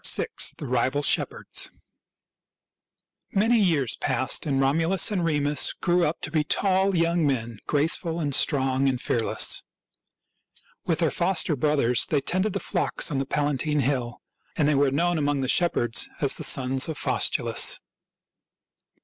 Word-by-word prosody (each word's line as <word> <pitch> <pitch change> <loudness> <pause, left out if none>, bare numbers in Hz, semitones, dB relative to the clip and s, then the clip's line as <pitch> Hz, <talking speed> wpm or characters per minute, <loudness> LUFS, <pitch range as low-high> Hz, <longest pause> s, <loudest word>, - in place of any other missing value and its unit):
VI. - - +2 0.3
THE - - -7
RIVAL 130 +3 -1
SHEPHERDS - - 0 1.6
Many 225 +4 +2
years 160 - +1
passed, 130 +2 0
and 135 -2 0
Romulus 165 +9 +1
and 185 -4 -1
Remus 145 -3 +1
grew 175 -1 0
up 155 - -3
to - - -5
be 155 -2 +1
tall 190 +4 +1
young 170 -1 +1
men, 115 -5 -3
graceful 160 +3 -1
and 145 -4 -2
strong 135 -1 +2
and 130 -2 -2
fearless. 115 -2 0 1.2
With - - +1
their - - 0
foster 185 -4 +1
brothers 140 -4 +1
they 150 - +1
tended 185 +7 0
the - - -2
flocks - - -1
on 140 - -1
the 135 - -3
Palatine 150 +1 -1
Hill, 125 -3 -2 0.3
and 150 - +2
they 150 - +2
were 140 0 +2
known 170 +5 0
among 145 -1 -1
the 130 - -2
shepherds 120 -7 +1
as 140 - +2
the - - -6
sons 130 +2 +1
of 155 - -4
Faustulus. - - +2
145 Hz, 150 wpm, -25 LUFS, 135-170 Hz, 1.6 s, VI